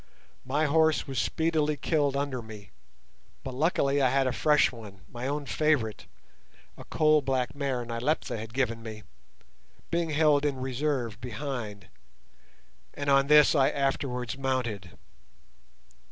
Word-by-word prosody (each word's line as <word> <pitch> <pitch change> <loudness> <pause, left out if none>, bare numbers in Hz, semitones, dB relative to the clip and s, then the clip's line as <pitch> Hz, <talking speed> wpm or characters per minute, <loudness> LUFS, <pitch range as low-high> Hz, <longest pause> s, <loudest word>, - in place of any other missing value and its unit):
My 145 +4 +1
horse 160 +1 +2
was 135 -2 -3
speedily 155 -2 0
killed 145 -2 0
under 140 -3 -2
me, 105 -4 -12 0.7
but 130 - -6
luckily 140 -1 +1
I 130 - +4
had 135 +1 +2
a 130 - +1
fresh 150 -1 +3
one, 105 -5 -12
my 120 +2 -6
own 145 +1 -2
favourite, 140 -8 0 0.7
a - - -12
coal 155 -1 +3
black 130 -2 -1
mare 135 -4 -2
Nyleptha 120 +7 -2
had 110 +1 -8
given 115 -2 -1
me, 110 -2 -8 0.9
being 170 -1 0
held 150 -1 +3
in 145 -2 0
reserve 130 -3 -2
behind, 120 -5 -5 1.1
and 145 -1 -1
on 135 0 +4
this 150 -1 +6
I 135 -3 +4
afterwards 135 -3 -2
mounted. 120 -9 -3
135 Hz, 135 wpm, -28 LUFS, 120-150 Hz, 1.1 s, this